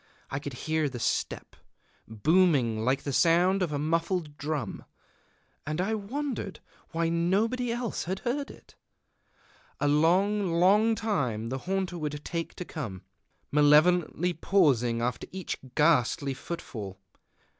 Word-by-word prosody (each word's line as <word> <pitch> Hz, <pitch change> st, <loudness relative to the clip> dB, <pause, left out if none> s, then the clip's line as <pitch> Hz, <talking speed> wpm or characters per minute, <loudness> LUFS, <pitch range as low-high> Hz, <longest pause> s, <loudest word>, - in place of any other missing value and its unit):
I 135 Hz, -, -2 dB
could 140 Hz, -1 st, -6 dB
hear 155 Hz, -2 st, +1 dB
the 125 Hz, -, -7 dB
step, 115 Hz, -, -2 dB, 0.5 s
booming 125 Hz, -, +2 dB
like 130 Hz, +3 st, +1 dB
the 140 Hz, -, -3 dB
sound 180 Hz, +5 st, +4 dB
of 175 Hz, -4 st, 0 dB
a 145 Hz, -, -1 dB
muffled 165 Hz, +1 st, -1 dB
drum, 145 Hz, -6 st, -4 dB, 0.8 s
and 155 Hz, +2 st, -3 dB
I 195 Hz, +5 st, 0 dB
wondered 225 Hz, 0 st, -4 dB, 0.3 s
why 165 Hz, -1 st, 0 dB
nobody 210 Hz, +9 st, +1 dB
else 240 Hz, -1 st, -3 dB
heard 240 Hz, +10 st, -2 dB
it. -, -, -15 dB, 1.1 s
A 145 Hz, -, +1 dB
long, 180 Hz, +6 st, +3 dB
long 205 Hz, +6 st, +4 dB
time 130 Hz, -, -1 dB
the 130 Hz, +2 st, -3 dB
haunter 190 Hz, -2 st, -1 dB
would 150 Hz, -1 st, -3 dB
take 165 Hz, -1 st, -4 dB
to 180 Hz, -, -6 dB
come, 110 Hz, -, -6 dB, 0.5 s
malevolently 155 Hz, +4 st, +4 dB
pausing 130 Hz, -, +2 dB
after 125 Hz, -1 st, -2 dB
each 190 Hz, -2 st, -4 dB, 0.2 s
ghastly 145 Hz, -3 st, +3 dB
footfall. 115 Hz, -, -7 dB
165 Hz, 125 wpm, -28 LUFS, 140-190 Hz, 1.1 s, sound